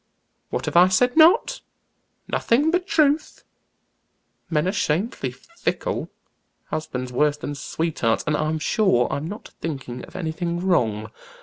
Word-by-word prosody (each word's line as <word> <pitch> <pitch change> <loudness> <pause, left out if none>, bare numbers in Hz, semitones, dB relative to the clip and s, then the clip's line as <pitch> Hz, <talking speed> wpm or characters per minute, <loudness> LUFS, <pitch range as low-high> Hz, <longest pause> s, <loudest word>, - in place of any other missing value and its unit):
"What - - -3
have - - -4
I 175 +1 +8
said 245 +7 +2
now? 335 +7 +7 0.8
Nothing 285 +7 +2
but 360 +2 0
truth. 300 -2 +1 1.1
Men 155 +1 +1
are - - +2
shamefully 180 - -1
fickle, 335 - -4 0.6
husbands 130 -5 -4
worse 150 +3 +2
than 145 0 -5
sweethearts, 145 -4 -1
and 150 - +1
I'm 155 +1 0
sure 155 - +2
I'm 145 +3 -3
not 205 +5 -8
thinking 135 -6 -5
of - - -18
anything 170 0 -2
wrong. 110 - 0
165 Hz, 130 wpm, -23 LUFS, 140-220 Hz, 1.1 s, I